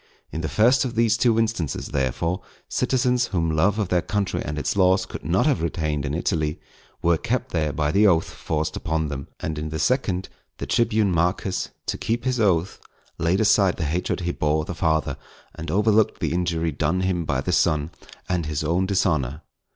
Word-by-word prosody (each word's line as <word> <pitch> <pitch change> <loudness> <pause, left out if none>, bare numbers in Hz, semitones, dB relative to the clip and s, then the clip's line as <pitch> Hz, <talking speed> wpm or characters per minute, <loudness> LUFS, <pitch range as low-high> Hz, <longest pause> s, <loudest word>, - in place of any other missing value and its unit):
In 80 - -4
the 80 - -2
first 120 - +4
of 125 -3 -4
these 115 -1 +3
two 115 -1 +2
instances, 110 -10 -1
therefore, 65 +7 -1 0.3
citizens 125 -1 +1
whom 85 -4 0
love 95 +6 +2
of 105 -5 -1
their 90 -1 +2
country 100 0 -1
and 75 +1 -4
its 75 - -1
laws 95 0 +3
could - - -8
not - - +2
have - - +2
retained 75 -3 -1
in 70 - -2
Italy, 80 -3 -1 0.4
were 85 -1 +3
kept 125 +1 -2
there 75 -3 0
by 75 0 0
the 105 +5 +5
oath 85 -4 +3
forced 75 0 -3
upon 80 -2 -1
them; 70 -1 -5
and 75 -1 -3
in 75 +1 -4
the 80 - -4
second, 95 - 0 0.3
the - - -4
tribune 110 -4 +2
Marcus, 90 +2 0 0.2
to - - -3
keep 120 +2 -2
his 130 -2 0
oath, 95 -4 +1 0.4
laid 85 +3 +2
aside 100 -3 +4
the - - -2
hatred 85 +5 -1
he 85 0 -1
bore 75 -1 0
the - - -5
father, 80 -4 0 0.4
and 80 - -7
overlooked 105 +2 +2
the - - -1
injury 85 -2 0
done 80 +5 0
him 90 -2 0
by 70 -4 -1
the 65 - -2
son, 75 +1 +2 0.4
and 90 -3 -1
his 75 0 -2
own 85 +5 +1
dishonour. 80 -7 0
85 Hz, 195 wpm, -24 LUFS, 80-100 Hz, 0.4 s, the